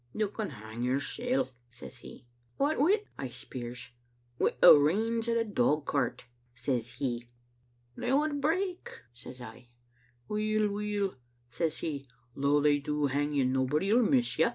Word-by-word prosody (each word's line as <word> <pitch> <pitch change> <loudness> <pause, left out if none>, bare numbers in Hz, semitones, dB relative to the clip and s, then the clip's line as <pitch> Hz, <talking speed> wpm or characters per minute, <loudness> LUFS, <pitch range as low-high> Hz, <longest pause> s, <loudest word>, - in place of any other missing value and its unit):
' - - -34
'You 215 -2 0
can 210 -1 -4
hang 110 -3 -8
yoursel*,' 140 - 0 0.2
says 115 - -10
He. - - -12 0.3
'What 290 +3 +1
wi'?' 395 +9 +3 0.2
I 135 - -3
speirs. 125 0 -7 0.5
*Wi' - - +2
the - - +10
reins 220 +10 +2
o' 230 - +2
the 230 0 +1
dogcart,' 145 - 0 0.3
says 120 -1 -2
He. 120 -3 -3 0.7
'They 245 - -2
would 290 +1 +1
break,' 355 +5 -2
says 125 +1 -10
I. 120 +1 -11 0.6
'Weel, 215 0 +1
weel,' 205 -2 -2 0.4
says 160 +6 -1
He, 140 -4 -4 0.3
'though 140 +1 +2
they 145 0 +4
do 150 +1 -1
hang 145 +2 0
you, 135 -2 +3
nobody 130 +8 +1
'11 235 0 +4
miss 255 -4 +2
you.' - - +5
150 Hz, 155 wpm, -30 LUFS, -, 0.7 s, the